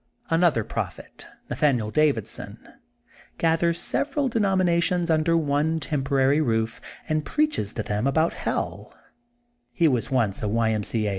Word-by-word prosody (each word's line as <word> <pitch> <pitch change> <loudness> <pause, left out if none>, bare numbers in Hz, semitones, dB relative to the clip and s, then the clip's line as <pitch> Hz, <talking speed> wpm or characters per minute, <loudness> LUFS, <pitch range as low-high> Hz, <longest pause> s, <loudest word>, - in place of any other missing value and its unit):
Another 165 -8 +3
prophet, - - -6 0.2
Nathanial 125 -8 0
Davidson, 150 -8 0 0.8
gathers 165 +1 +1
several 280 -1 0
denominations 180 -5 +1
under 160 +1 +2
one 155 +1 0
temporary 140 -1 +1
roof, 115 -4 -1 0.3
and 155 -1 0
preaches 300 - 0
to 110 - -3
them 105 +5 -1
about 160 +4 +2
helL - - -4 0.8
He 170 -3 +2
was 125 -6 0
once 115 -7 0
a 105 - -1
Y. 110 +1 +1
M. 105 -1 -1
C. 110 +1 -2
A. - - 0
150 Hz, 135 wpm, -24 LUFS, 115-170 Hz, 0.8 s, Another